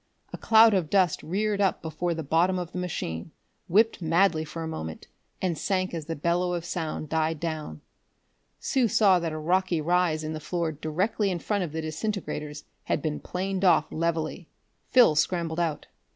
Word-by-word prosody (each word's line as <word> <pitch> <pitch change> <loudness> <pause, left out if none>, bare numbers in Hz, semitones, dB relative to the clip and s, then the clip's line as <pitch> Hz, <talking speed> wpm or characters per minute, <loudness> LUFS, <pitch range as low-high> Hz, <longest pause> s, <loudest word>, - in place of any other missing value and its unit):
A - - -4
cloud 225 0 +6
of 180 -6 0
dust 185 -4 +2
reared 205 +4 -1
up 195 - +1
before 165 +2 -2
the 160 - -4
bottom 170 +6 +2
of 175 -2 -4
the 180 - -4
machine, 85 - -4 0.4
whipped 220 +3 +3
madly 165 0 +2
for 160 +2 -6
a - - -4
moment, 80 - -6 0.4
and 180 -3 +1
sank 185 +2 -1
as 160 -3 -5
the 165 - -3
bellow 175 +3 0
of 170 -1 -4
sound 160 -3 -4
died 160 0 0
down. 155 - -4 0.8
Sue 260 -3 +1
saw 205 -5 +4
that 165 -1 -2
a 155 - -4
rocky 180 +2 +1
rise 165 -1 +1
in 155 +1 -3
the 155 - -4
floor 170 +1 -2
directly 180 +8 -1
in 180 - -1
front 200 +3 -1
of 165 - -5
the 160 +1 -4
disintegrators 155 -3 -4 0.2
had - - 0
been 155 -2 -2
planed 190 +1 -3
off 165 -4 +4
levelly. 165 0 -2 0.4
Phil 245 -10 +6
scrambled 165 +1 0
out. 165 -3 -1
170 Hz, 180 wpm, -27 LUFS, 155-185 Hz, 0.8 s, cloud